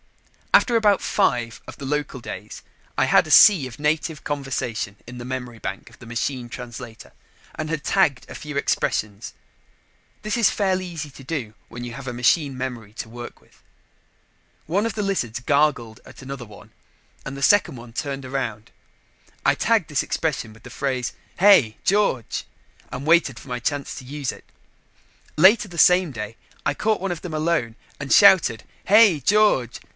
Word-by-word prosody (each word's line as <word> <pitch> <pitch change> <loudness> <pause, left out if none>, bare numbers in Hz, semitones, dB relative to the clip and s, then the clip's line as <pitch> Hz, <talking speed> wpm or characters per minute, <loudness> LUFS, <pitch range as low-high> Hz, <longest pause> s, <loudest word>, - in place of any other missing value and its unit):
After 240 - +5
about 210 -3 +4
five 120 - 0
of - - -10
the 140 - -8
local 145 -1 -2
days, - - -8 0.3
I - - +3
had - - +4
a - - -6
sea 180 -11 +7
of 125 +1 -12
native 155 +1 -1
conversation 125 -8 -3
in 125 +1 -9
the 120 - -7
memory 125 -2 -6
bank 100 - -6
of 115 - -19
the 120 - -13
machine 120 +1 -3
translator 120 -1 -9 0.4
and 155 0 -4
had 155 -2 -3
tagged 155 -10 +1
a - - -10
few 150 -1 -6
expressions. 105 -6 -1 0.9
This 215 0 -1
is 230 -4 +4
fairly 190 -2 0
easy 160 -4 -6
to 135 - -13
do 130 -7 -4 0.2
when 120 +1 -8
you 120 -1 -6
have 140 +1 -9
a - - -2
machine 130 +3 +1
memory 120 -5 -6
to 115 - -6
work 120 +1 -9
with. - - -27 1.0
One 195 +7 0
of 230 - -2
the 210 - -2
lizards 125 - -2
gargled 135 -4 0
at - - -14
another 135 -2 -7
one 105 -2 -15 0.5
and 135 0 -7
the 140 - -5
second 205 -3 +4
one 120 0 -12
turned 135 +1 -4
around. 120 -5 -4 0.7
I - - +5
tagged - - +1
this - - 0
expression 110 - -2
with 110 +1 -18
the - - -10
phrase, 130 -3 -2 0.3
"Hey, 180 - +5
George!" 195 - +1 0.5
and 130 +3 -6
waited 160 -6 +3
my 125 -2 -4
chance 140 +3 -3
to 130 - -9
use 140 -1 -4
it. - - -14 0.9
Later 205 +6 +5
the 170 - -10
same 180 -1 +5
day, 105 -2 -6 0.3
I - - +2
caught 215 +7 0
one 195 0 -3
of 175 - -5
them 170 -4 -6
alone 155 -8 0 0.2
and 140 -1 -6
shouted 185 - +6 0.2
"Hey, 205 -5 +6
George!" 145 - +2
135 Hz, 175 wpm, -23 LUFS, 120-170 Hz, 1.0 s, sea